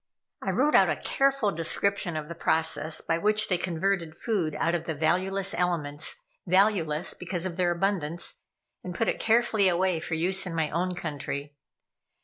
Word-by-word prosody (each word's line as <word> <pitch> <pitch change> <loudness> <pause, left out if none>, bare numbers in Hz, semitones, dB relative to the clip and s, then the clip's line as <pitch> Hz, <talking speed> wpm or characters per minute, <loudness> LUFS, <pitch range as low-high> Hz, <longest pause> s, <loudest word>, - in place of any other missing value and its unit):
I - - -3
wrote 295 +4 +2
out - - +6
a - - +1
careful 275 -6 +1
description 170 +2 0
of 150 -1 -5
the 170 - -6
processes 160 -1 +1
by 165 - +1
which 215 +3 +2
they 180 - +2
converted 175 -1 -1
food 185 -10 -1
out 165 - 0
of 175 - -1
the 160 - -3
valueless 185 +5 0
elements 155 -4 -1 0.3
valueless 180 -4 +2
because 180 -1 -4
of 180 -2 -3
their 180 -1 +1
abundance 175 -2 -1 0.4
and 180 -1 -6
put 225 - 0
it - - 0
carefully 225 -3 +3
away 180 -1 +1
for 165 +1 -3
use 185 +3 +1
in 170 - -5
my 160 -2 0
own 180 +3 -1
country. 145 -3 -5
175 Hz, 170 wpm, -27 LUFS, 160-195 Hz, 0.4 s, out